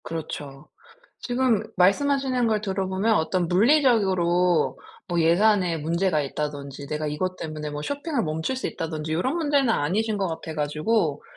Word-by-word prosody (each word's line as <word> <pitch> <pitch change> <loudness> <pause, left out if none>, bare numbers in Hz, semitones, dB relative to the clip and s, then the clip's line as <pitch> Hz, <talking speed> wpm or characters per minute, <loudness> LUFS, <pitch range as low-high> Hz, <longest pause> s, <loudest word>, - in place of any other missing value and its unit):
그렇죠. 150 -3 -7 0.5
지금 245 -4 +1
말씀하시는 255 +6 +2
걸 215 -1 +1
들어보면 195 +1 0
어떤 175 0 +1
물리적으로 185 - +3 0.3
뭐 175 -1 0
예산에 180 +1 +3
문제가 165 +1 0
있다든지 140 -1 -5
내가 150 +1 -3
이것 185 +5 -2
때문에 155 -2 -5
뭐 150 0 -5
쇼핑을 285 - -2
멈출 160 +11 -2
수 260 - -3
있다든지 155 -1 -4
요런 255 - 0
문제는 285 -6 +2
아니신 210 +6 0
것 195 -2 0
같아가지고. 160 - -1
180 Hz, 345 characters per minute, -24 LUFS, 155-225 Hz, 0.5 s, 물리적으로